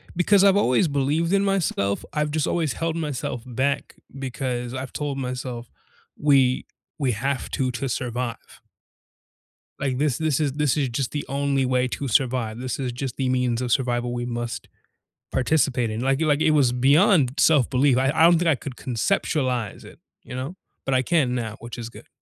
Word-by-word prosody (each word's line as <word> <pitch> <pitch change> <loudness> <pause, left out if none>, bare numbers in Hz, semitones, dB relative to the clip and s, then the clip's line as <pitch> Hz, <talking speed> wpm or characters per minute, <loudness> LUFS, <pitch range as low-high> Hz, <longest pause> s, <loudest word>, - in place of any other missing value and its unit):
because 190 +3 +4
I've 200 0 +5
always 160 0 +3
believed 150 +5 0
in 200 - +3
myself. 170 - 0
I've 150 -1 0
just 155 -1 0
always 160 -6 0
held 165 0 -2
myself 145 -7 -3
back 130 +3 -2 0.2
because 125 -2 -3
I've 130 -1 -6
told 145 -2 -3
myself 125 -2 -5 0.5
we 135 -3 +3 0.3
we 135 -3 +1
have 130 +5 -2
to 130 -3 0
to 130 +2 -3
survive. 120 -1 -4 1.2
Like, 130 -2 -1
this 145 -4 +1
this 155 -3 0
is 145 -3 0
this 150 -2 +1
is 140 -3 +1
just 120 +2 -2
the 145 -1 -3
only 140 -1 0
way 125 0 +1
to 135 +2 -4
survive. 120 -2 +1
This 125 -1 -4
is 130 -3 -2
just 125 0 -5
the 130 -2 -1
means 125 -2 +1
of 125 - -2
survival 120 -1 0
we 120 0 -3
must 120 -1 -4 0.6
participate 130 -3 +1
in. 110 +2 -3
Like, 135 +3 +1
it 160 - +2
like, 145 0 +2
it 155 - +4
was 140 -5 +4
beyond 140 +2 +4
self-belief. 135 -3 +4
I 135 +2 +2
I 160 - +3
don't 170 0 +7
think 175 - 0
I 155 - +4
could 130 0 -8
conceptualize 125 - -1
it, - - -14 0.2
you 125 - -8
know, 135 +8 -5 0.3
but 135 - 0
I 130 - +3
can 135 -4 +1
now, 110 -3 -3
which 120 +1 -8
is 115 -1 -6
good. - - -14
130 Hz, 185 wpm, -24 LUFS, 125-150 Hz, 1.2 s, don't